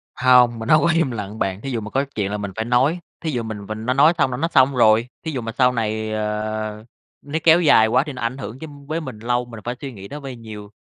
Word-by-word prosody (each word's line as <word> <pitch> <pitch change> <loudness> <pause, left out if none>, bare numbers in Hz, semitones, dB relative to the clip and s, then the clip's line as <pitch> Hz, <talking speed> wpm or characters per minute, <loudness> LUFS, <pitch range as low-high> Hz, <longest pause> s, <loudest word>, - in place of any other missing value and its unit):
Hông, 125 -2 +4
mình 110 - -5
hông 155 0 +6
có 170 - +2
im 165 -6 +1
lặng 105 -1 -6
bạn. 95 +1 -2
Thí 135 - -5
dụ 115 -3 -2
mà 105 - -7
có 135 +4 0
chuyện 100 -2 -1
là 105 - -2
mình 100 -1 -5
phải 110 - -3
nói, 130 +8 +2 0.2
thí 160 - -2
dụ 120 -3 -2
mình 105 -2 -6
mình 110 +1 -6
nó 125 - +1
nói 145 +5 +5
xong 135 -4 +2
là 125 - -3
nó 165 - 0
xong 135 -4 +3
rồi. 115 -1 +4 0.2
Thí 160 - -3
dụ 130 - -3
mà 115 0 -5
sau 125 +1 +3
này, 110 -2 -2
ờ, 110 0 -3 0.4
nó 145 +3 -3
kéo 165 +1 +6
dài 110 -9 +5
quá 125 +4 +3
thì 150 - -6
nó 125 - -8
ảnh 115 +3 -2
hưởng 130 -1 -7
chứ 160 - -7 0.2
với 160 +2 -2
mình 130 -7 -8
lâu, 120 +2 -1
mình 115 -2 -10
phải 120 +3 -3
suy 140 - -5
nghĩ 100 -2 -10
nó 145 - -7
vơi 135 -3 -7
nhiều, 105 -3 -10
120 Hz, 290 wpm, -21 LUFS, 110-135 Hz, 0.4 s, hông